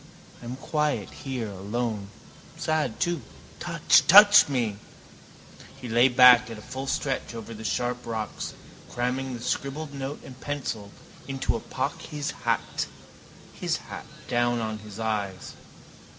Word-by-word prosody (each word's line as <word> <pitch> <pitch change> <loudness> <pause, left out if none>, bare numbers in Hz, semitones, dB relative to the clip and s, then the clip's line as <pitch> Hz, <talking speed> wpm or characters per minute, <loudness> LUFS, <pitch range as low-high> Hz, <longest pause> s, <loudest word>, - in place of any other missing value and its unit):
I - - -10
am 120 +2 -5
quiet 150 +1 -1
here 125 -6 -5
alone. 105 +1 -3 0.5
Sad 155 -7 -1
too. 175 -4 0 0.4
Touch, - - +4
touch 205 -1 +9
me. 115 -7 0 1.0
He 125 - -7
lay 120 +2 +5
back 125 -1 +7
at 110 -2 -8
full 130 +2 -6
stretch 135 -3 -2
over 115 0 -7
the 110 0 -9
sharp 125 +2 -1
rocks, 110 -2 -4 0.3
cramming 125 +1 -2
the 120 - -8
scribbled 145 +3 -3
note 135 +1 -5
and 130 0 -12
pencil 130 -8 -4 0.4
into 135 -1 -1
a - - -2
pocket, - - -4
his 150 -1 -3
hat - - -1 0.7
tilted - - -2 0.4
down 120 -1 +1
on 110 -1 -3
his 105 0 -10
eyes. 105 -4 -3
125 Hz, 135 wpm, -26 LUFS, 110-135 Hz, 1.0 s, touch